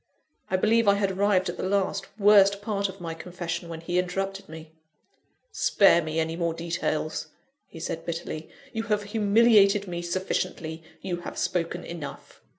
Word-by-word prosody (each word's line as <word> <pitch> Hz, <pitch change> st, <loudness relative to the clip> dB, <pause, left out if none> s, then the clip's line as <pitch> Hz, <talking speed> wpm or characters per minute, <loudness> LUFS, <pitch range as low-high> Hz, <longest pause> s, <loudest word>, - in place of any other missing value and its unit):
I 185 Hz, -, +2 dB
believe 225 Hz, +3 st, +3 dB
I 200 Hz, -, +6 dB
had 200 Hz, -1 st, 0 dB
arrived 195 Hz, -1 st, +2 dB
at 175 Hz, -, -4 dB
the 185 Hz, -, -2 dB
last, 195 Hz, -1 st, 0 dB
worst 200 Hz, -1 st, +5 dB
part 200 Hz, -2 st, -1 dB
of 195 Hz, +1 st, -10 dB
my 165 Hz, -2 st, -5 dB
confession, 170 Hz, 0 st, -5 dB
when 165 Hz, -1 st, -6 dB
he 175 Hz, +2 st, 0 dB
interrupted 195 Hz, +1 st, -3 dB
me. 160 Hz, 0 st, -10 dB, 0.8 s
"Spare 195 Hz, -4 st, +4 dB
me 155 Hz, 0 st, -2 dB
any 160 Hz, 0 st, -1 dB
more 170 Hz, -1 st, -1 dB
details," 165 Hz, -2 st, -2 dB, 0.4 s
he 165 Hz, -, -11 dB
said, 165 Hz, 0 st, -4 dB
bitterly, 165 Hz, -2 st, -5 dB, 0.2 s
"you 225 Hz, -, -1 dB
have 210 Hz, -2 st, 0 dB
humiliated 205 Hz, -1 st, +4 dB
me 175 Hz, -1 st, -4 dB
sufficiently 170 Hz, -2 st, -3 dB, 0.2 s
you 180 Hz, -2 st, -2 dB
have 175 Hz, -, -8 dB
spoken 175 Hz, 0 st, -1 dB
enough." 155 Hz, -5 st, -8 dB
180 Hz, 160 wpm, -26 LUFS, 165-200 Hz, 0.8 s, I